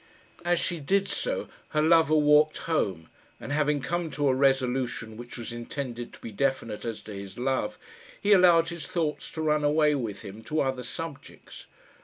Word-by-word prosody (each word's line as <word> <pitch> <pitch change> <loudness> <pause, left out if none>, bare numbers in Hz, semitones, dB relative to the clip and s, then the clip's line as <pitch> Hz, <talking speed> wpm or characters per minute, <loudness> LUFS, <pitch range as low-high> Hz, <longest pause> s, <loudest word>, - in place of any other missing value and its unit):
As 175 0 +2
she 175 -2 -1
did 195 +7 +1
so - - -2 0.3
her - - +5
lover 160 -1 +5
walked 150 0 +5
home, 95 - -1 0.3
and - - -7
having 150 -1 +1
come 170 +3 -2
to 145 0 0
a - - +4
resolution 130 -4 +1
which 120 +2 -8
was 120 0 -6
intended 120 0 -5
to - - -13
be 115 - -7
definite 115 -2 -1
as 115 -2 -4
to 105 - -8
his 100 -1 -8
love, 130 - -1 0.4
he 205 - +4
allowed 175 -3 +6
his 170 -3 -6
thoughts 160 -4 -2
to 160 - -3
run 150 -1 +2
away 150 +1 +4
with 115 -8 -3
him 105 +1 -9
to 155 +4 0
other 130 -1 -1
subjects. 145 +4 -8
145 Hz, 180 wpm, -27 LUFS, 120-160 Hz, 0.4 s, allowed